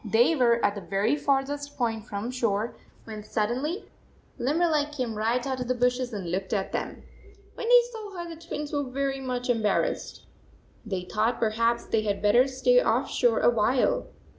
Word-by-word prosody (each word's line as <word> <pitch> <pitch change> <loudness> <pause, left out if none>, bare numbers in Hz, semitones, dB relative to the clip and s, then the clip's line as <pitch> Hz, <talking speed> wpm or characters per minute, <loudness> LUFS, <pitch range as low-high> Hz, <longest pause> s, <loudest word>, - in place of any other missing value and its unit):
They 235 - +3
were 235 -4 +3
at 200 - +2
the 205 - -7
very 195 +8 +1
farthest 285 0 -1
point 225 -3 -1
from 210 +2 -4
shore, 230 -3 -1 0.3
when 215 -2 -8
sud 210 0 -1
denly 300 - -3 0.5
Limberleg 300 +3 +1
came 255 -6 -3
right 230 +3 0
out 260 -1 -2
of 250 - -3
the 255 - +1
bushes 250 +1 +1
and 190 -6 -5
looked 190 +3 -2
at 195 -2 -1
them! - - -4 0.5
When 460 - -4
they - - +8
saw 425 -4 -8
her, 345 0 -5
the 330 -1 -9
Twins 300 -3 -5
were 290 - +1
very 270 0 -2
much 250 -2 -3
em 240 -3 +1
barrassed. 210 -2 -1 0.6
They 195 -5 -3
thought 215 +6 0
perhaps 230 +1 +1
they 225 - +1
had 205 -2 -1
better 215 +6 +4
stay 275 - +3
off - - +1
shore 485 - +2
a - - +5
while. 240 +3 +1
245 Hz, 190 wpm, -27 LUFS, 220-285 Hz, 0.6 s, they